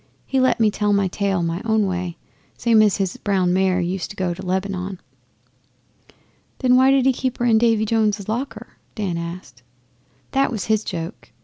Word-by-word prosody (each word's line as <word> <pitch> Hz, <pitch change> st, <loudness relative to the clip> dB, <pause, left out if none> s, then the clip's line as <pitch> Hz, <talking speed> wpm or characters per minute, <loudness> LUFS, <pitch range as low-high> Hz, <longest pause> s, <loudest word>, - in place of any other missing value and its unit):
But 270 Hz, -, +2 dB
let 255 Hz, -, +2 dB
me 220 Hz, -2 st, +4 dB
tell 205 Hz, 0 st, 0 dB
my 200 Hz, -1 st, +2 dB
tale 195 Hz, -1 st, -1 dB
my 170 Hz, +2 st, -2 dB
own 220 Hz, -2 st, +2 dB
way, 180 Hz, -2 st, -3 dB, 0.4 s
same 225 Hz, -2 st, +4 dB
as 210 Hz, -2 st, +3 dB
his 190 Hz, -3 st, -2 dB
brown 190 Hz, -3 st, +1 dB
mare 185 Hz, 0 st, +2 dB
used 180 Hz, +1 st, -2 dB
to 205 Hz, -, -9 dB
go 185 Hz, -3 st, -1 dB
to 190 Hz, +2 st, -9 dB
Lebanon.' 190 Hz, 0 st, -3 dB, 1.6 s
'Then 250 Hz, -1 st, +3 dB
why 260 Hz, +1 st, +5 dB
did 270 Hz, -1 st, +3 dB
he 265 Hz, -, +4 dB
keep 255 Hz, 0 st, -3 dB
her 240 Hz, -, -1 dB
in 225 Hz, -2 st, +4 dB
Davy 225 Hz, -2 st, +3 dB
Jones's 215 Hz, -2 st, 0 dB
locker?' 245 Hz, +6 st, -5 dB, 0.2 s
Dan 195 Hz, -6 st, -2 dB
asked. 170 Hz, -7 st, -7 dB, 0.7 s
'That 275 Hz, 0 st, +2 dB
was 220 Hz, -5 st, -3 dB
his 215 Hz, -1 st, +1 dB
joke. 170 Hz, +2 st, -6 dB
200 Hz, 185 wpm, -21 LUFS, 185-225 Hz, 1.6 s, why